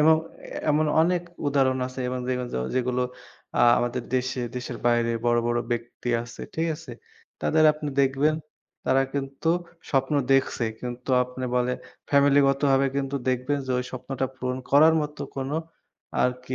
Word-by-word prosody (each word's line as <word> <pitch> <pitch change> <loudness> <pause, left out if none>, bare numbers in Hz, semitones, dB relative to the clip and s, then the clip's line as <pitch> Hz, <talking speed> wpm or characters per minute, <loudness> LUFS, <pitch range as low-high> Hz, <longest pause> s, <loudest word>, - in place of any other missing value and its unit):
এমন 160 +1 +6 0.5
এমন 155 +1 +3
অনেক 175 +1 +2 0.2
উদাহরণ 135 -2 +2
আছে। 130 +1 -7
এবং 125 - -2
দেখবেন 125 -1 -1 0.3
যেগুলো 125 0 +1 0.5
আ - - +1 0.2
আমাদের 120 +1 -1
দেশে 130 0 0 0.2
দেশের 125 -1 -4
বাইরে 120 -1 +3 0.2
বড় 120 0 +4
বড় 120 0 +1
ব্যক্তি 120 +1 -4
আছে। 120 -1 -11
ঠিক 165 +1 0
আছে? 160 - -11 0.5
তাদের 155 0 +3
আপনি 150 -1 -5
দেখবেন 140 +3 +3 0.5
তারা 135 +1 +3
কিন্তু 140 +3 -3 0.4
স্বপ্ন 135 +1 +1 0.2
দেখছে। 135 -3 +2 0.2
কিন্তু 125 +1 -5
আপনি 125 +1 -6
বলে 125 0 +2 0.4
ফ্যামিলিগতভাবে 140 -1 +4
কিন্তু 140 0 -1
দেখবেন 130 +3 0
যে - - -4
ওই 125 - -2
স্বপ্নটা 130 +1 -3
পূরণ 125 0 -2
করার 155 +3 +7
মতো 150 0 -6 0.2
কোন 135 0 -3 0.7
আরকি 125 +1 -1
130 Hz, 145 wpm, -26 LUFS, 125-140 Hz, 0.7 s, করার